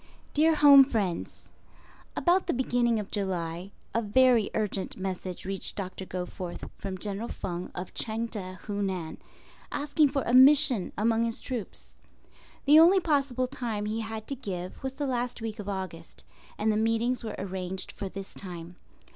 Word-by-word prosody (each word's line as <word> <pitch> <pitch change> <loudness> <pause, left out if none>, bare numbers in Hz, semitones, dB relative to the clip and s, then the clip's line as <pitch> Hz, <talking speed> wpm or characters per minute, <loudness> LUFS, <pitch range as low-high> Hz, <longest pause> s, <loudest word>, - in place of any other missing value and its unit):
Dear 315 +2 +4
Home 285 -2 +9
Friends: 210 -10 -3 0.6
About 360 +2 +2
the - - +1
beginning 240 -2 +1
of 205 - -6
July, 180 -2 -2 0.2
a 230 - +1
very 235 0 +4
urgent 205 -3 -2
message 185 -1 -5
reached 195 0 -4
Doctor 190 -1 -5
Goforth 180 -1 -5
from 190 -1 -5
General 205 +4 -3
Feng 175 -4 -5
of 180 +1 -6
Chang 225 +1 -1
teh, 185 -5 -6
Hunan, 190 -5 -3 0.5
asking 290 0 +2
for 275 0 -1
a 240 - -1
"mission" 265 -4 +6
among 225 +2 +2
his 230 -1 -3
troops. 245 -7 -6 0.7
The 295 +3 +8
only 355 +4 +7
possible 275 -6 +1
time 235 -5 -3
he 215 +2 -2
had 220 -1 -5
to 275 - -1
give 185 -8 -6
was 265 0 -3
the 290 +1 -3
last 245 -2 -2
week 225 -1 -5
of 205 -1 -5
August, 170 - -6 0.3
and 215 +1 +2
the 210 - +1
meetings 225 +2 +1
were 220 - -4
arranged 190 -1 -4
for 195 - -6
this 195 0 -8
time. 175 -2 -8
220 Hz, 160 wpm, -28 LUFS, 190-255 Hz, 0.7 s, Home